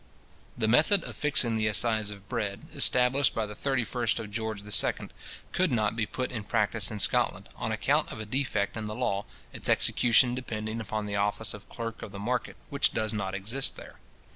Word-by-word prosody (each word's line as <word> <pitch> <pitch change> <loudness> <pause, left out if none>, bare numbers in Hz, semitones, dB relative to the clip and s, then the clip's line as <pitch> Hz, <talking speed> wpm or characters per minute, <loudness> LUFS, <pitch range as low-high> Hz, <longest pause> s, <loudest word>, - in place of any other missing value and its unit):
The 110 -2 +1
method 160 - +4
of - - -7
fixing 130 -6 +3
the 110 0 +1
assize 110 0 +3
of 100 0 -10
bread, 110 -4 -3
established 130 +2 +3
by 110 - 0
the 105 - -8
31st 125 -1 0
of 105 -2 -6
George 110 -1 -3
II. 105 0 +2 0.4
could 185 -3 +1
not 110 -3 +1
be 110 -2 -1
put 130 +3 -4
in 115 -4 -4
practice 105 -1 0
in 110 - -5
Scotland, 100 - +1
on - - -3
account - - +1
of - - -7
a 110 - -5
defect 110 -4 -1
in 110 -1 -4
the 105 0 -5
law, 100 -1 -1 0.3
its - - -3
execution 120 +1 +4
depending 110 -3 -4
upon 105 0 -3
the 100 0 -3
office 105 +2 0
of 100 -2 -12
clerk 115 -1 -6
of - - -7
the 100 - -8
market, 120 +5 -2 0.2
which 140 0 +2
does 110 -1 0
not 100 -2 -2
exist 115 +8 -1
there. - - -12
110 Hz, 195 wpm, -28 LUFS, 105-125 Hz, 0.4 s, method